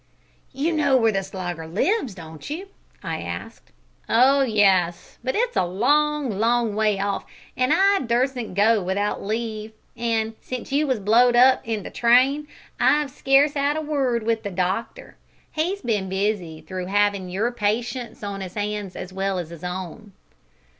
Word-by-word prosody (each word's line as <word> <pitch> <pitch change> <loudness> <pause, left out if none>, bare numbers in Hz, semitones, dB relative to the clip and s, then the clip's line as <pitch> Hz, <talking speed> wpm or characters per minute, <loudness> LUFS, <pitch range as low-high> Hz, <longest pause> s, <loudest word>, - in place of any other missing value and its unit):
"You 290 +5 -1
know 285 -4 +3
where 225 -3 +3
the 195 -2 0
Slogger 180 -4 -6
lives, 245 - 0
don't 160 - -10
you?" 360 +7 -5 0.3
I - - -3
asked. - - -7 0.4
"Oh 265 +4 +5
yes, 195 -8 +2
but 260 - -1
it's 485 +2 0
a - - +3
long, 265 +5 +1
long 230 -1 +2
way 210 -1 +1
off, 200 0 -1 0.3
an' 255 +1 +1
I 390 +4 +4
durstn't 245 -3 -1
go 215 +2 +4
without 195 +3 -1
leave, 220 0 -4 0.2
an' 225 -1 -1
since 255 0 -6
you 295 +2 +2
was 260 -4 0
blowed 235 +4 +4
up 255 +2 +6
i' 225 - 0
the 205 - -7
train 260 +5 +3 0.3
I've 295 -2 +3
scarce 275 +2 +3
'ad 285 +1 +1
a - - -1
word 270 -6 0
with 225 0 0
the 205 - -4
doctor 190 - -3 0.3
he's 355 +6 -2
bin 210 -5 0
that - - -7
busy 190 -6 -2
through 180 +3 -6
'avin' 200 -1 +1
your 210 +7 -1
patients 235 +2 -2
on 200 -1 -4
'is 185 +1 -7
'ands 205 -2 -3
as 185 - -7
well 195 0 -1
as 170 -2 -5
is 170 -1 -11
own." 185 +3 -6
225 Hz, 165 wpm, -23 LUFS, 195-265 Hz, 0.4 s, up